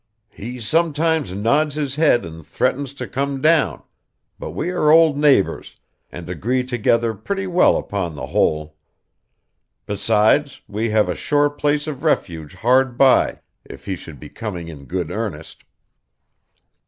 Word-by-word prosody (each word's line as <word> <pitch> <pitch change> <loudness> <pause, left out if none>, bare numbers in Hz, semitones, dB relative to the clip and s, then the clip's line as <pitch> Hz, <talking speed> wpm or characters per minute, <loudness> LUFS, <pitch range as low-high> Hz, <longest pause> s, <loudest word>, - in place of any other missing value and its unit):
'He 120 +5 -8
sometimes 160 - +1
nods 140 +10 +1
his 145 -3 -2
head 140 - +2
and 80 -1 -10
threatens 130 - -1
to - - -6
come 140 +1 -2
down; 160 +2 +2 0.6
but - - -6
we 175 +4 -3
are 165 -4 +1
old 160 -1 +6
neighbors, 145 -8 +1 0.3
and 85 -1 -9
agree 115 - -1
together 120 -2 0
pretty 195 - -4
well 180 -1 +3
upon 90 -6 -4
the 65 -3 -6
whole. 75 +2 -1 1.1
Besides 110 +7 +1
we 110 +2 -2
have 105 -2 +2
a 90 - -1
sure 145 - +1
place 145 0 -1
of 145 -4 -6
refuge 80 - -1
hard 125 +1 +2
by 135 -1 +3 0.2
if - - -13
he 95 - -3
should 80 -5 -12
be - - -11
coming 90 -7 -6
in 70 -4 -11
good 90 +1 -4
earnest. 100 -7 -6
120 Hz, 145 wpm, -20 LUFS, 95-145 Hz, 1.1 s, old